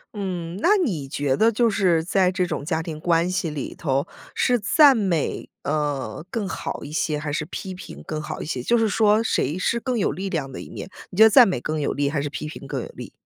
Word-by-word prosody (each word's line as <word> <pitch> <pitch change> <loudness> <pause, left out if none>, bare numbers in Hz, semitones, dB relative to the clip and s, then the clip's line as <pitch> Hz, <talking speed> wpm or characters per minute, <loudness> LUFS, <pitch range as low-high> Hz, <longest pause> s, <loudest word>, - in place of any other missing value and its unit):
嗯， 180 -3 -4
那 415 +4 +5
你 180 - -1
觉 140 -2 0
得 225 +1 +4
就 230 0 +2
是 180 -6 +2
在 185 +1 +2
这 180 -1 0
种 140 - -3
家 160 0 -1
庭 155 -2 -6
关 170 +1 +2
系 185 -3 -1
里 150 -3 -5
头， 140 -2 -1 0.3
是 245 -2 +2
赞 275 +6 +6
美， 185 -8 -1
呃， 145 -4 -2
更 210 -2 -2
好 - - -5
一 145 - -8
些， 155 -1 0
还 150 -1 -4
是 155 - -1
批 190 +2 -6
评 185 - -10
更 155 -1 -4
好 150 - -6
一 - - -5
些？ 130 -5 -3
就 235 - +2
是 225 -1 +3
说 215 +1 +3
谁 155 - 0
是 235 +5 0
更 250 0 -2
有 205 - +1
力 195 +1 -4
量 145 -7 -3
的 - - -7
一 - - -10
面， - - -7 0.2
你 180 - -10
觉 220 - +9
得 220 - +8
赞 245 -2 +8
美 180 - -1
更 155 +3 -3
有 - - 0
力， 140 0 0
还 145 -3 -1
是 145 - -3
批 150 - -6
评 140 -3 -9
更 - - -3
有 - - -7
力？ - - -10
170 Hz, 265 characters per minute, -23 LUFS, 150-205 Hz, 0.3 s, 觉